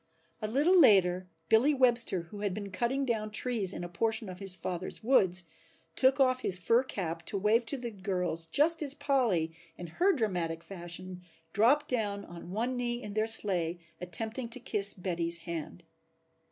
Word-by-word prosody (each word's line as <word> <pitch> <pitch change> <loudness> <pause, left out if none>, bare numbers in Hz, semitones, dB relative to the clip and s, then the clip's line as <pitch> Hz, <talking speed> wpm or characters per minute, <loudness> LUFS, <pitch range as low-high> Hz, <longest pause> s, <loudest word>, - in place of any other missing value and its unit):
A 215 - -2
little 290 - +2
later 185 - +4 0.2
Billy 255 - +3
Webster, 240 -7 +5
who 205 - -9
had 200 -3 -3
been 200 -2 -7
cutting 245 +7 -1
down 220 -4 -2
trees 215 -3 +1
in 175 - -6
a - - -5
portion 220 +4 -1
of 180 0 -9
his 195 -2 +4
father's 185 +3 -5
woods, 190 -7 +2 0.5
took 265 +1 +3
off 255 -1 +3
his 190 -7 +3
fur 230 +7 +2
cap 170 -10 -5
to 200 - -2
wave 220 +4 +1
to 280 - -3
the 240 -2 -6
girls 180 -5 -2
just 315 - +2
as 285 -2 -2
Polly 235 - 0 0.3
in 175 - -8 0.2
her 390 +2 +5
dramatic 175 - -2
fashion 180 0 -8 0.3
dropped 265 +9 +3
down 205 -5 -2
on 170 0 -11
one 235 +7 -2
knee 240 -1 -2
in 210 - -7
their 215 +1 0
sleigh 180 -6 +3 0.2
attempting 220 +7 -2
to 245 +2 -7
kiss 205 -5 0
Betty's 170 -2 +2
hand. 170 0 -7
210 Hz, 175 wpm, -29 LUFS, 180-245 Hz, 0.5 s, Webster